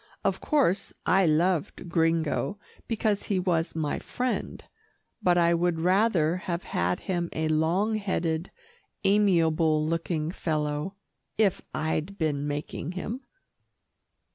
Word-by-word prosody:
Of - - 0
course, 260 - +1
I 190 -1 +4
loved 165 +2 +1
Gringo 165 +2 +1 0.3
because 215 -3 0
he 200 - 0
was 170 -3 0
my 155 -2 -1
friend, 250 0 -3 0.6
but 175 -1 +3
I 170 0 +4
would 170 -1 +1
rather 180 -2 +3
have 175 -1 -3
had 90 +1 -1
him 175 -2 -2
a 160 0 -1
long 175 +8 +2
headed, 175 -4 -1 0.5
amiable 165 -6 +3
looking 165 -1 -1
fellow, 150 +1 -2 0.4
if 205 -4 +2
I'd 160 +5 -2
been 145 -3 0
making 145 +2 -4
him. 220 +7 -4
170 Hz, 115 wpm, -27 LUFS, 155-190 Hz, 0.6 s, I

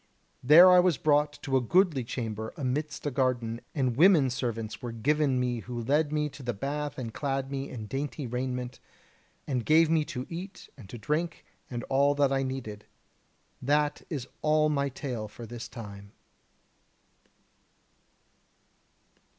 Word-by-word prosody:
There 180 +7 +8
was 175 -5 +2
I - - -28
brought 150 -1 +3
to 135 -1 +1
a - - +1
goodly 165 - +3
chamber 110 -2 -5
amidst 150 +3 -3
a 145 - 0
garden; 125 -3 -1
and 130 -5 0
women 155 -4 +5
servants 115 -3 -3
were 120 - -4
given 135 +3 +1
me 125 -1 -1
who 120 +1 -6
led 145 +4 +1
me 150 0 0
to 140 0 -12
the 120 -3 -3
bath 145 +6 -3
and 115 -4 -5
clad 135 0 -2
me 135 0 -3
in 110 -4 -7
dainty 140 +4 -4
raiment, 125 +1 -4 0.7
and 130 -5 -1
gave 160 +3 +4
me 160 -2 +3
to 125 -3 -5
eat 180 +4 -8
and 115 -9 -13
to 120 - -7
drink, 155 +8 -2 0.2
and 120 -2 -4
all 140 +2 +2
that 140 -1 +2
I 135 - +1
needed. 130 -6 -5 0.8
That 145 +2 +1
is 135 -6 -4
all 155 0 +3
my 140 -2 0
tale 125 -5 -5
for 115 +3 -10
this 120 0 -7
time." 100 -3 -10
135 Hz, 155 wpm, -28 LUFS, 120-150 Hz, 0.8 s, There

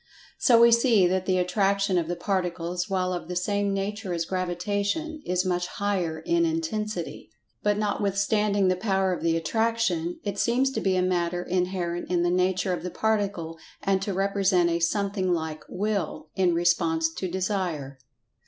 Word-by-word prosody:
So 235 -2 +5
we 235 0 +7
see 235 -4 +5
that 185 +1 0
the 185 -1 +2
Attraction 195 +1 +1
of 165 - -3
the 175 - -2
Particles, 180 0 -2
while 185 -1 0
of 175 -2 -5
the 180 - -5
same 200 +2 0
nature 195 -1 -3
as 165 -1 -1
Gravitation, 200 - -2
is 180 +1 +1
much 180 -1 0
higher 185 -5 -2
in 170 +1 +1
intensity. 170 +4 -3 0.3
But 205 0 +1
notwithstanding 205 -1 +1
the 185 - +3
power 190 -1 +1
of 175 - -5
the 165 0 +2
Attraction, 185 -2 0
it 200 -1 -3
seems 255 +3 +2
to - - -3
be 190 -1 +1
a 180 - +2
matter 175 -1 0
inherent 180 -1 -2
in 175 -1 +1
the 175 - +2
nature 185 +1 +1
of 175 - -3
the 180 - -4
Particle, 200 -7 -1 0.2
and 195 -1 +1
to 200 - -2
represent 195 -2 +2
a 170 - 0
something 195 +2 0
like 160 -2 -2
Will, 200 -5 -2
in 180 -3 +2
response 165 -2 +2
to 185 - -3
Desire. 180 -7 -2
185 Hz, 170 wpm, -26 LUFS, 175-200 Hz, 0.3 s, we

